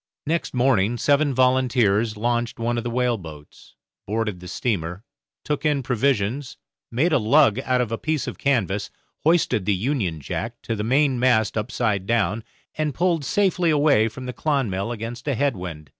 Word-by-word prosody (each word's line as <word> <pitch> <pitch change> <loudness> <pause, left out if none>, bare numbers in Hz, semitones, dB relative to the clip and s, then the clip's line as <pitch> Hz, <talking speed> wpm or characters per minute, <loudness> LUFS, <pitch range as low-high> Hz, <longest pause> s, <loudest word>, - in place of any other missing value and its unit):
Next 165 -2 -2
morning 120 -3 +2
seven 145 +3 +2
volunteers 125 -4 +2
launched 120 +1 -1
one 120 +1 -1
of - - -5
the 120 - -3
whaleboats, 110 -12 -4 0.3
boarded 105 -3 -2
the 90 - -10
steamer, 90 -3 -3 0.4
took 150 -1 -2
in 145 -3 +1
provisions, 125 +1 0 0.3
made 150 +9 +1
a 140 - +4
lug 125 +1 +4
out 130 -1 +1
of 120 -3 -2
a 115 - -2
piece 155 -3 -1
of - - -6
canvas, 105 -7 0 0.3
hoisted 160 - +2
the 105 - +3
Union 100 - -1
Jack 115 - -5
to 115 - -2
the 105 - -3
mainmast 125 -3 +2
upside 105 -2 -1
down, 110 -1 +1 0.3
and 155 -3 -2
pulled 170 -3 +1
safely 185 +2 +1
away 145 -7 +4
from 125 +3 -8
the 125 - -5
'Clonmel' 115 -6 -1
against 120 +3 -6
a 140 - +1
head 140 0 +1
wind. 85 -5 -7
120 Hz, 165 wpm, -23 LUFS, 105-140 Hz, 0.4 s, a